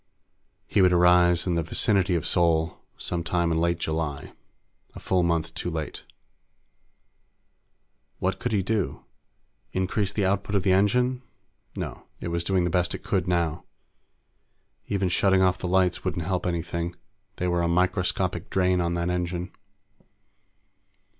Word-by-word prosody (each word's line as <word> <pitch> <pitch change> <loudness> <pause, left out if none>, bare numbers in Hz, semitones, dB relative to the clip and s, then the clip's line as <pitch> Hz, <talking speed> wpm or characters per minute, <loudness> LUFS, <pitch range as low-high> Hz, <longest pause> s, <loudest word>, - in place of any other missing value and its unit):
He 105 - +2
would 90 -1 +5
arrive 90 0 +5
in 90 - 0
the 85 - +1
vicinity 95 +2 +1
of 80 - -1
Sol 85 -1 +1 0.2
some 85 -1 -3
time 85 0 0
in 80 - +1
late 85 0 +1
July 80 -3 -3 0.6
a - - -7
full 95 -1 +1
month 85 -2 0
too 80 +3 -3
late. 80 -2 -5 2.1
What 95 +1 -1
could 120 0 -2
he 100 -3 +1
do? 105 -1 -2 0.7
Increase 95 +2 0
the 100 -1 0
output 100 +2 0
of 100 - +1
the 95 - +3
engine? 125 +7 +2 0.5
No. - - -6
It - - -4
was 85 0 -1
doing 95 0 +1
the 85 - 0
best 90 0 +1
it - - -9
could 90 -3 0
now. 85 -2 0 1.2
Even 100 -2 0
shutting 95 +2 +3
off 95 0 +2
the - - -3
lights 90 0 +2
wouldn't 85 -3 -2
help 90 0 -1
anything; 85 0 -3 0.4
they 90 - -2
were 85 -1 +1
a 85 - +1
microscopic 90 0 0
drain 90 -1 +2
on 85 0 0
that 85 +1 -1
engine. 90 0 -3
90 Hz, 150 wpm, -26 LUFS, 85-95 Hz, 2.1 s, would